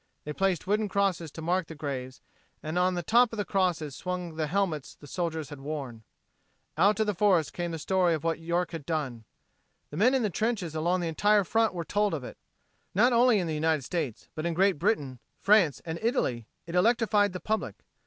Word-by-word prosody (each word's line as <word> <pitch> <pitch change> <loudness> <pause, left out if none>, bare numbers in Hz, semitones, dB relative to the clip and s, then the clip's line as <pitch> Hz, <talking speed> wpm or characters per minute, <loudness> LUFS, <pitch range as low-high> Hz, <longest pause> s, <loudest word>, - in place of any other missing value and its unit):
They 150 - -5
placed 190 0 0
wooden 210 +2 0
crosses 190 -5 0
to 160 - -8
mark 180 0 0
the 160 - -9
graves 130 -4 -5 0.4
and 160 +3 -1
on 180 0 +2
the 175 - -2
top 240 +6 +4
of 225 - -6
the 205 - -1
crosses 170 -7 0
swung 180 -2 -4
the 155 -1 -2
helmets 170 -5 -1
the - - -15
soldiers 160 -2 -3
had 145 - -9
worn. 135 -6 -5 0.7
Out 195 +6 +4
from 220 - +2
the 210 - 0
forest 185 -4 +2
came 175 -1 -3
the 165 - -4
story 175 +1 +2
of 155 - -6
what 165 -1 0
York 170 +2 -1
had 165 -4 -6
done. 135 -9 -3 0.7
The 145 - -6
men 245 +8 +4
in 260 - +1
the 210 - 0
trenches 215 -6 -1
along 170 +3 0
the 170 - -1
entire 205 +5 +3
front 225 +1 +1
were 170 -1 -3
told 205 -1 +1
of 140 - -6
it. - - -9 0.6
Not 240 +5 +4
only 240 -1 +5
in 185 - 0
the 160 - -2
United 155 -1 +1
States, 150 -6 -4
but 155 - -5
in 170 - -2
Great 190 -3 +3
Britain, 145 - 0 0.2
France 195 -8 +3
and 165 0 -4
Italy, 130 - 0 0.2
it 170 - -8
electrified 210 +1 +3
the 180 - -4
public. 220 +3 -2
175 Hz, 215 wpm, -28 LUFS, 155-205 Hz, 0.7 s, only